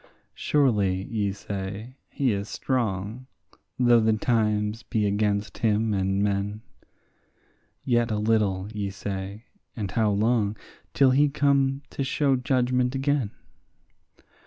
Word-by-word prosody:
Surely, 105 -10 +1
ye 105 -2 -1
say, 100 +4 -6
he 135 -4 0
is 100 +1 -4
strong, 115 0 -2 0.5
though 120 -2 +5
the 110 0 +3
times 105 -1 0
be 110 -4 -1
against 100 0 0
him 110 -1 +1
and 95 0 0
men; 100 +1 -1 1.2
Yet 120 -2 +2
a 110 - -1
little, 105 -3 +1
ye 100 -2 -2
say, 100 +2 -6 0.3
and 100 -5 -4
how 110 0 +2
long, 105 0 +1 0.4
till 135 -2 +5
he 145 +3 +4
come 140 -1 +1
to 140 - -2
show 135 +1 +1
judgment 125 0 +1
again? 135 -4 0
110 Hz, 120 wpm, -26 LUFS, 100-125 Hz, 1.2 s, though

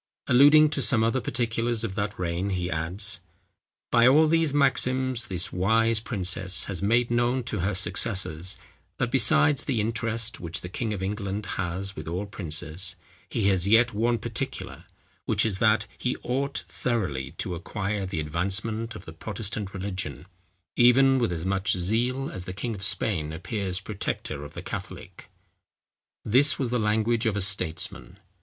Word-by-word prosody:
Alluding 145 +4 +6
to - - -1
some 115 -5 +4
other 115 +3 +1
particulars 115 -1 -1
of 110 -4 -3
that 105 +1 -3
reign 90 +2 -2
he 90 -2 -2
adds:—"By 100 +7 -1
all 150 +5 +6
these 165 -1 +2
maxims, 130 -3 +2
this 90 -2 -3
wise 110 +4 +2
princess 95 -4 +1
has 95 -3 -5
made 115 +4 +2
known 120 +2 +1
to 110 -3 -3
her 95 +3 -1
successors 95 -2 -1 0.4
that 120 - -1
besides 135 +3 +5
the 130 -6 0
interest 115 +1 -2
which 85 -1 -4
the 90 - -7
king 110 +3 -3
of 100 -3 -4
England 100 +1 -3 0.2
has 95 +3 -4
with 80 - -8
all 90 +5 -3
princes, 85 -2 -2 0.3
he 100 -3 +1
has 95 -1 +2
yet 115 +3 +4
one 115 +3 +1
particular, 120 +4 -5 0.4
which - - +3
is 100 -4 -1
that, 110 0 +3
he 125 - -1
ought 140 +3 -2
thoroughly 75 - -2
to 90 - -3
acquire 100 +4 -3
the 95 -4 -3
advancement 100 +9 -1
of - - -10
the 80 - -9
Protestant 105 +2 -4
religion, 95 -8 -5 0.5
even 130 +2 +5
with 120 -6 0
as 85 0 -4
much 95 +2 +1
zeal 120 +9 -1
as 90 -1 -7
the 90 - -6
King 115 +4 -4
of 100 - -8
Spain 100 -5 -1
appears 95 +3 -3
protector 100 -8 -4
of 75 +1 -10
the 85 - -7
Catholic." 95 -1 -8 1.0
This 135 +6 +4
was 130 -4 -2
the 125 - +1
language 110 +2 +1
of 105 -2 0
a - - 0
statesman. 85 -10 +1
105 Hz, 160 wpm, -26 LUFS, 90-120 Hz, 1.0 s, Alluding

